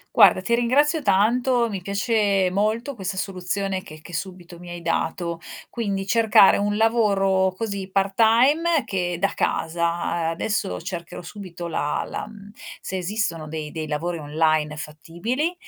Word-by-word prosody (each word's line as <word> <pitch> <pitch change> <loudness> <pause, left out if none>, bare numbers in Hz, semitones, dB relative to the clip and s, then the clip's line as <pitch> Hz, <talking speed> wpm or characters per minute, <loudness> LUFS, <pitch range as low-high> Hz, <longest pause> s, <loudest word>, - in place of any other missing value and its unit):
Guarda, - - +7
ti 235 - 0
ringrazio 290 +7 +2
tanto, 240 +3 +2
mi 195 -4 -5
piace 200 -1 +1
molto 215 +8 0
questa 190 -3 -4
soluzione 190 0 -2
che 155 -2 -12
che 170 +2 -11
subito 175 0 -6
mi 175 0 -10
hai 175 0 -6
dato; 170 0 -2 0.3
quindi 200 -5 -3
cercare 220 -3 +6
un 205 +1 0
lavoro, 195 -4 +2
così, 200 -3 -4
part 195 0 0
time 270 - +4
che 180 -3 -2
da 195 - +3
casa, 170 0 -1
adesso 165 - -2
cercherò 170 -2 -6
subito 175 -1 -8
la 150 -2 -1
la - - -5
mhmm, 205 -1 -13 0.3
se 190 - -5
esistono 180 -4 -2
dei 155 -1 -5
dei 155 0 -5
lavori 165 +3 -2
online 155 0 0
fattibili, 175 - -3
195 Hz, 145 wpm, -23 LUFS, 170-220 Hz, 0.3 s, Guarda